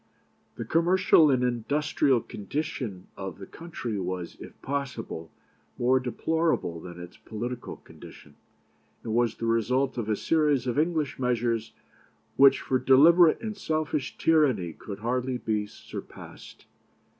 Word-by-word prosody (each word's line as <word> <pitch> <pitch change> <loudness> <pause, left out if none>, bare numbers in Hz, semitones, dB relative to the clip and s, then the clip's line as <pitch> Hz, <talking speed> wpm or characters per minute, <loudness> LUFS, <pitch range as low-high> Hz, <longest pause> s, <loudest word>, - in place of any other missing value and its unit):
"The 115 - -5
commercial 170 +1 +4
and 130 -2 +2
industrial 130 +1 +1
condition 110 -5 -5
of 95 -3 -6
the 100 - -9
country 130 - -6
was, 90 -1 -4
if - - -12
possible, 130 - -4 0.5
more 130 +2 +3
deplorable 130 - -1
than 85 +1 -10
its 90 0 -10
political 120 +3 -6
condition, - - -15 0.7
and 110 - -3
was 120 -1 +1
the 115 - -5
result 125 +4 +1
of 110 -2 -3
a 110 - +2
series 150 0 +1
of 125 +3 0
English 155 -5 0
measures 120 -3 -1 0.6
which 135 0 +6
for 130 - 0
deliberate 155 +6 +6
and 220 -2 -4
selfish 155 -6 -2
tyranny 130 - +2
could 100 -1 -9
hardly 125 +2 -1
be 105 -3 -2
surpassed. - - -11
125 Hz, 130 wpm, -27 LUFS, 110-150 Hz, 0.7 s, which